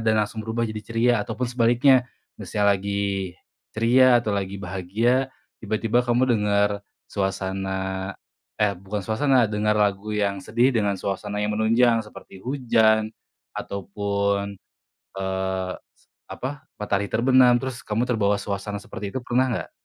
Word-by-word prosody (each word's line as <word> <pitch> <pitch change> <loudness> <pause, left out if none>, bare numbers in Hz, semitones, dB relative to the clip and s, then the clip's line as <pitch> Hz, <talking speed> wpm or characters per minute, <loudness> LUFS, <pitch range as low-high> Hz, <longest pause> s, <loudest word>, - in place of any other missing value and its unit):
dan 110 -1 +2
langsung 110 +1 -3
berubah 115 +1 -1
jadi 110 0 -5
ceria 115 +1 +2
atau - - -5
pun 125 - 0
sebaliknya? 125 +2 +4 0.3
Misal 105 +1 -1
lagi 100 -1 0 0.4
ceria 120 +2 +5
atau 105 -3 -2
lagi 95 0 -3
bahagia, 105 +9 0 0.3
tiba-tiba 110 +3 +1
kamu 120 +1 +2
dengar 100 0 +1 0.2
suasana, 95 0 -2 0.5
eh 100 -2 +2
bukan 100 +3 -5
suasana, 120 +3 +2
dengar 105 0 +1
lagu 105 +1 0
yang 100 -2 -1
sedih 120 +2 +3
dengan 100 -2 +1
suasana 105 +1 -3
yang 105 0 -1
menunjang 115 +1 +3
seperti 105 -2 -13
hujan 110 -5 +3 0.5
atau 100 -2 -5
pun, 100 0 -1 0.7
eee, 95 -1 -2 0.6
apa, 130 - -4 0.3
matahari 100 -1 -1
terbenam, 125 +1 +5
terus 130 -2 -5
kamu 110 +3 0
terbawa 105 -4 +2
suasana 100 +1 -4
seperti 100 -1 -7
itu, - - -2
pernah 130 +2 +2
nggak? - - -4
105 Hz, 135 wpm, -24 LUFS, 100-115 Hz, 0.7 s, ceria